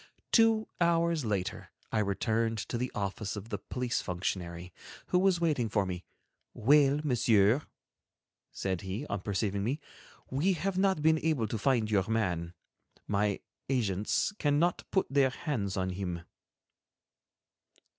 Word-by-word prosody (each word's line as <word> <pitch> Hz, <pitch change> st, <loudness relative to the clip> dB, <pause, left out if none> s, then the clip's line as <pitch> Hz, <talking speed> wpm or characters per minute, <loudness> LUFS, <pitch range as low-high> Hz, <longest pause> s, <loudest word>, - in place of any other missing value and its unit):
Two 225 Hz, -2 st, +4 dB
hours 170 Hz, -3 st, +2 dB
later 100 Hz, -4 st, -2 dB, 0.2 s
I 110 Hz, -, +1 dB
returned 110 Hz, +3 st, 0 dB
to 120 Hz, -, -1 dB
the 125 Hz, +1 st, -2 dB
office 100 Hz, +1 st, -3 dB
of 105 Hz, +2 st, -7 dB
the 105 Hz, -4 st, -3 dB
police 125 Hz, +4 st, -2 dB
functionary, 90 Hz, -1 st, -4 dB, 0.4 s
who 180 Hz, -, +3 dB
was 185 Hz, -2 st, +3 dB
waiting 150 Hz, -9 st, +1 dB
for 100 Hz, -1 st, +1 dB
me. 90 Hz, -1 st, -4 dB, 0.5 s
"Well, 145 Hz, +3 st, +4 dB
Monsieur," 120 Hz, -3 st, +4 dB, 0.9 s
said 95 Hz, -2 st, -2 dB
he, 100 Hz, +8 st, -4 dB
on 100 Hz, -, -3 dB
perceiving 100 Hz, 0 st, -1 dB
me, 130 Hz, +8 st, -1 dB, 0.5 s
"we 155 Hz, +9 st, +2 dB
have 190 Hz, +2 st, -2 dB
not 190 Hz, -6 st, +2 dB
been 160 Hz, 0 st, +4 dB
able 155 Hz, -8 st, +1 dB
to 110 Hz, -, -3 dB
find 115 Hz, -4 st, +2 dB
your 100 Hz, 0 st, +2 dB
man. 90 Hz, -6 st, -1 dB, 0.5 s
My 100 Hz, 0 st, 0 dB, 0.3 s
agents 105 Hz, -, +1 dB
cannot 150 Hz, +4 st, +1 dB
put 190 Hz, -, +2 dB
their 135 Hz, -1 st, +3 dB
hands 115 Hz, -8 st, -3 dB
on 95 Hz, 0 st, 0 dB
him." 90 Hz, -2 st, -4 dB
115 Hz, 135 wpm, -31 LUFS, 100-150 Hz, 0.9 s, Two